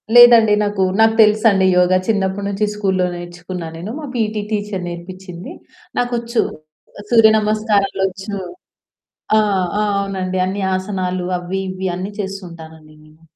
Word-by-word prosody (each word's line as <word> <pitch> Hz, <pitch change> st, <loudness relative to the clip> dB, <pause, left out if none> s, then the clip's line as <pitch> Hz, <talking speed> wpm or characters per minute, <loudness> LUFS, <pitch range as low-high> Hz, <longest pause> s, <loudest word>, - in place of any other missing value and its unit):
లేదండి, 235 Hz, -3 st, +8 dB
నాకు 205 Hz, -2 st, 0 dB, 0.2 s
నాకు 225 Hz, 0 st, +5 dB
తెలుసండి 210 Hz, -2 st, +4 dB
యోగా 180 Hz, +1 st, +4 dB
చిన్నప్పటి 200 Hz, -2 st, 0 dB
నుంచి 200 Hz, +1 st, 0 dB
స్కూల్లో 190 Hz, -3 st, 0 dB
నేర్చుకున్నానేను. 175 Hz, +1 st, -7 dB
మా 305 Hz, -, -6 dB
పీటీ 215 Hz, -2 st, -1 dB
టీచర్ 205 Hz, -3 st, -3 dB
నేర్పించింది. 180 Hz, -, -9 dB, 0.5 s
నాకొచ్చు, 235 Hz, -1 st, 0 dB, 0.7 s
సూర్యనమస్కారాలోచ్చు. 210 Hz, -3 st, +2 dB, 1.0 s
ఆ! -, -, +5 dB, 0.4 s
ఆ! -, -, +2 dB, 0.2 s
అవునండి. 190 Hz, -2 st, -3 dB
అన్ని 195 Hz, +2 st, -3 dB
ఆసనాలు 185 Hz, -2 st, -3 dB
అవి 180 Hz, +2 st, -4 dB
ఇవి 185 Hz, 0 st, -3 dB
అన్ని 185 Hz, +3 st, -5 dB
చేస్తూంటానండి 165 Hz, -5 st, -9 dB
నేను. 155 Hz, +1 st, -22 dB
195 Hz, 110 wpm, -18 LUFS, 180-215 Hz, 1.0 s, లేదండి